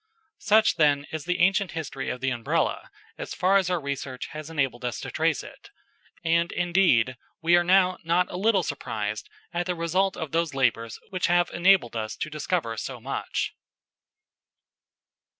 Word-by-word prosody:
Such, 215 +1 +4
then, 145 -2 +3
is 160 -1 -5
the 180 0 0
ancient 195 +1 +2
history 145 -5 -4
of 125 - -4
the 135 0 0
Umbrella, 120 -2 -1 0.3
as - - -5
far 190 +2 +3
as 190 -2 +1
our 180 -1 +1
research 140 -3 -5
has 155 0 -7
enabled 135 -6 -1
us 120 -2 -3
to - - -6
trace - - 0
it, - - -13 0.6
and, 170 +1 +2
indeed, 175 -9 +2 0.2
we 170 +1 +4
are 175 - +4
now 185 0 +3
not 170 +2 +2
a - - -6
little 195 0 +2
surprised 110 -7 -4 0.2
at 175 +1 -1
the 180 - -1
result 185 +3 0
of 160 -3 -5
those 165 -3 0
labours 115 -4 0
which 185 -1 0
have 175 0 +2
enabled 175 -9 +3
us 110 -1 -3
to 155 - -5
discover 155 -5 -2
so - - -5
much. - - -3
165 Hz, 170 wpm, -26 LUFS, 135-180 Hz, 0.6 s, Such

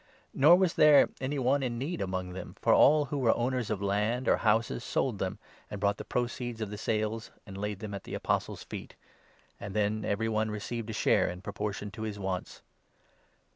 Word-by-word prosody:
Nor 155 +6 +7
was 185 -2 +2
there 150 -2 +6
any 135 +2 -2
one 135 +2 +2
34 - - -1
in 120 -1 -4
need 140 - -3
among 95 -1 -3
them, 95 - -8
for - - +3
all 150 0 +6
who 140 +1 -3
were 120 -4 +3
owners 125 -1 -1
of 105 -2 -2
land 105 +6 0
or - - +4
houses 110 - +1
sold - - -1
them, - - -2 0.3
and 105 - -6
brought 100 0 +1
the - - -6
proceeds 120 -1 -3
of 110 -2 -4
the 105 - -5
sales 110 +1 -1 0.2
and 100 -4 -10
laid 105 0 -4
them 105 -2 -6
at 100 - -6
the - - -6
Apostles' - - -2
feet; - - -8 0.6
and 100 -1 -7
then 105 0 0
every 110 +2 -1
one 110 0 0
received 110 +2 -4
35 - - -9
a 110 - -4
share - - +3
in 90 0 -7
proportion 105 0 -4
to 110 +1 -9
his 110 -2 -4
wants. 95 -2 -4
110 Hz, 210 wpm, -30 LUFS, 100-125 Hz, 0.6 s, Nor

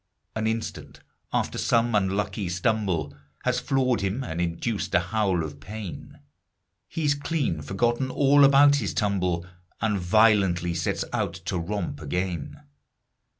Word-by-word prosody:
An 110 0 0
instant 110 0 -4 0.3
after - - -1
some 115 0 +2
unlucky 100 -1 0
stumble 90 -5 -1 0.3
Has 125 0 +1
floored 130 -4 +1
him 100 +7 -1
and 85 -5 -3
induced 90 +6 -2
a - - +6
howl 95 -1 0
of 75 -2 -7
pain, 100 +1 -8 0.7
He's 150 -3 0
clean 145 - -2
forgotten 120 - 0
all 140 +1 +5
about 140 +1 +7
his - - -2
tumble 90 -4 0 0.3
And 105 -2 0
violently 90 -3 +3
sets 85 -2 -1
out - - -1
to 90 - -1
romp 85 -4 -3
again. 85 +1 -3
100 Hz, 130 wpm, -26 LUFS, 85-120 Hz, 0.7 s, about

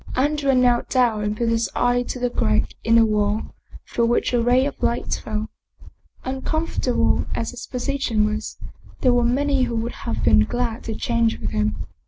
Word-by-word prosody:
Andrea 280 0 +1
knelt 245 -1 +3
down 235 -5 +2
and 210 0 -2
put 235 0 0
his 230 0 +1
eye 245 0 +2
to 245 - -5
the 245 -1 -1
crack 105 - +1
in 230 0 +3
the 230 -1 +6
wall, 210 0 0 0.3
through 235 -1 +1
which 240 +1 +1
a 240 - +3
ray 250 +3 +3
of 285 - -5
light 235 - -1
fell. 215 0 -4 0.7
Uncomfortable 265 0 0
as 230 - -2
his 245 - -9
position 250 -4 0
was, 215 +1 -3 0.4
there 255 - +4
were 245 0 +3
many 275 +3 +1
who 235 - -3
would 230 +1 -2 0.2
have - - -2
been 105 - +5
glad 240 - -2
to 225 - -3
change 235 -3 0
with - - -4
him. 105 0 -1
240 Hz, 185 wpm, -22 LUFS, 220-255 Hz, 0.7 s, the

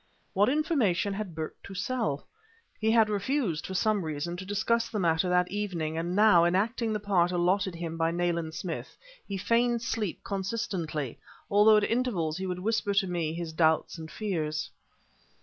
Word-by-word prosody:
What 205 +5 +4
information 260 - +1
had 195 -4 -5
Burke 160 -1 -6
to 195 - -10
sell? 190 - -2 0.5
He 220 - +1
had 225 -1 +5
refused, 205 - -1
for 190 - -5
some 210 0 +2
reason, 155 +2 -3
to 185 - -7
discuss 215 +3 +1
the 215 - -3
matter 170 -1 +2
that 180 0 +2
evening, 180 -6 -2
and 170 +2 -2
now, 205 -5 +6
enacting 220 +6 +1
the 210 - -1
part 185 -4 +2
allotted 180 +1 +1
him 165 -1 -5
by 165 0 +2
Nayland 170 -2 -1
Smith, 175 -3 -5 0.3
he 200 - -3
feigned 235 +3 +1
sleep 210 -6 -3
consistently, 190 - -3 0.3
although 210 +2 +6
at 210 - +2
intervals 205 -10 0
he 190 - -3
would 180 -1 -2
whisper 205 +1 0
to 195 -1 +3
me 170 -4 -1
his 170 -2 -5
doubts 160 +1 +2
and 160 0 -7
fears. 155 -6 -3
190 Hz, 170 wpm, -28 LUFS, 170-215 Hz, 0.5 s, now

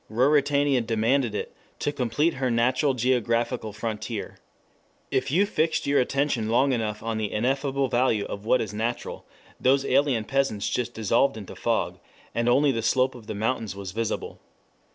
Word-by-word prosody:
Ruritania 140 +2 +3
demanded 115 +1 +1
it - - -4 0.2
to 145 - -1
complete 145 +4 0
her 130 -1 -1
natural 130 +4 +2
geographical 120 -2 0
frontier. 110 0 -5 0.7
If 130 +1 0
you 180 +9 +3
fixed 160 -4 0
your 140 0 +3
attention 130 -4 0
long 130 +4 +3
enough 110 -3 -2
on 115 -1 -2
the 105 -2 -2
ineffable 135 +4 0
value 120 -4 +1
of 100 - -6
what 125 +3 +3
is 105 -2 -4
natural, 115 +3 -3 0.3
those 135 +2 +3
alien 135 -4 +2
peasants 125 -5 0
just 120 -1 -2
dissolved 110 +3 +2
into 100 -3 -8
fog, - - -1 0.3
and 115 +1 +1
only 140 +3 +4
the 115 -3 -2
slope 130 +3 +2
of 120 -4 -13
the 110 - -4
mountains 110 -1 -2
was 100 -2 -6
visible. 115 +2 -3
120 Hz, 160 wpm, -26 LUFS, 110-135 Hz, 0.7 s, only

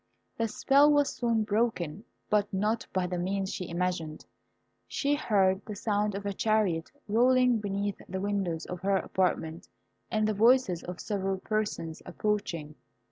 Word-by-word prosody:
The 230 - 0
spell 280 +6 +4
was 290 -1 +3
soon 230 -3 +1
broken, 210 -4 -1 0.2
but 210 -1 +1
not 210 +4 0
by 185 -1 0
the 180 0 -3
means 195 +2 -1
she 180 - -5
imagined. 170 -3 -2 0.6
She 285 0 0
heard 195 -9 +2
the 210 - -7
sound 210 -1 0
of 200 +1 -5
a 200 - -1
chariot 200 -6 +1 0.2
rolling 250 +2 +4
beneath 200 -1 -2
the 190 +1 -3
windows 195 -5 -1
of 180 - -6
her 195 0 +2
apartment, 170 -4 -1 0.4
and 215 -2 +1
the 215 - +1
voices 225 -4 +4
of 180 0 -7
several 195 -2 -2
persons 205 -6 -3
approaching. 170 -8 -2
200 Hz, 150 wpm, -29 LUFS, 180-220 Hz, 0.6 s, spell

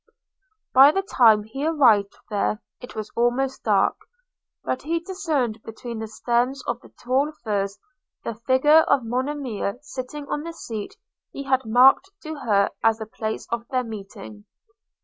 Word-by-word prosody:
By 270 +2 +9
the 390 +4 -1
time 225 - +5
he 235 +7 -6
arrived 245 -11 +3 0.2
there, 210 +1 -1 0.2
it 245 - -10
was 215 -1 -5
almost 255 +3 0
dark; - - +3 0.7
but 255 - -2
he 330 +3 -1
discerned 315 - -2
between 230 +1 -7
the 220 - -4
stems 245 +4 -1
of 240 0 -3
the - - -16
tall 270 +5 -1
firs 200 -3 -1 0.5
the 230 - -3
figure 260 +7 +4
of 280 -5 +2
Monimia 250 -4 -2
sitting 285 +1 -7
on 295 - -2
the 335 +2 -6
seat 220 -9 -6 0.4
he 275 - -6
had 265 -2 +1
marked 255 +11 +5
to 315 - -5
her 210 -9 +1
as 225 -1 +4
the 220 - -6
place 220 0 -5
of 235 0 -3
their 255 -1 0
meeting. 195 - -9
245 Hz, 155 wpm, -24 LUFS, 220-280 Hz, 0.7 s, By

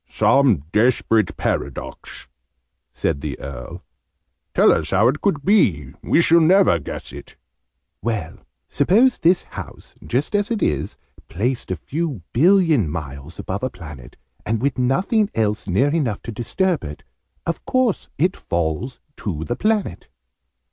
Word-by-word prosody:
"Some 125 - +3
desperate 110 -2 +2
paradox!" - - -4 0.6
said 70 - -2
the 75 -2 -4
Earl. 65 -3 -8 0.7
"Tell - - +6
us - - 0
how - - +4
it 145 +4 -2
could 155 -9 0
be. 90 - +2
We 170 - +3
shall 170 0 +5
never 170 - +5
guess 70 - -7
it." - - -11 0.7
"Well, 110 -8 -3 0.3
suppose 225 - +3
this 175 +2 +3
house, - - -10
just 140 - -1
as 205 +1 +1
it 230 -3 -1
is, 75 - -1 0.3
placed 120 +7 -2
a 95 - -1
few 145 - -4
billion 160 - +4
miles 75 0 -7
above 95 +2 -4
a 130 - -1
planet, 75 - -11 0.3
and 115 0 -1
with 130 +1 -1
nothing 195 - +2
else 105 -2 0
near 105 +10 +2
enough 130 -11 -1
to 115 - -6
disturb 165 - -1
it: 75 -1 -8 0.4
of 170 - -3
course 255 -5 0
it 180 +5 +2
falls 85 - -3 0.2
to 80 -7 -4
the 120 - -2
planet?" 215 - -1
125 Hz, 140 wpm, -21 LUFS, -, 0.7 s, Tell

